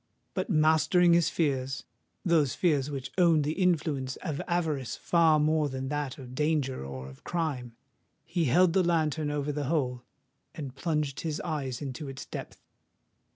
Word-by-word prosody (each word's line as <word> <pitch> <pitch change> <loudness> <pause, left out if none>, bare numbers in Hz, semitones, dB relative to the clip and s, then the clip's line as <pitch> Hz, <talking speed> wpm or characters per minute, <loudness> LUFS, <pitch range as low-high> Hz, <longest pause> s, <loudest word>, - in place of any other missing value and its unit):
But - - -2
mastering 160 +1 +4
his 170 -1 +4
fears,—those 140 +2 -1
fears 150 -6 +2
which 135 -3 -5
owned 165 -4 +5
the 150 - 0
influence 150 -7 +1
of 155 -5 -2
avarice 160 -7 -1
far 165 -3 +3
more 155 0 +2
than 130 0 -4
that 145 -3 -2
of 125 -2 -10
danger 150 - 0
or 65 -1 -7
of 65 0 -13
crime,—he 155 +1 -4
held 170 +6 +4
the 190 - +4
lantern 160 -3 +1
over 145 0 -1
the 145 0 -2
hole, 130 -5 0 0.5
and 140 -5 -6
plunged 150 -1 -1
his 155 -2 -3
eyes 145 -5 -3
into 140 +1 -5
its 135 0 -7
depth. - - -8
150 Hz, 150 wpm, -29 LUFS, 135-165 Hz, 0.5 s, owned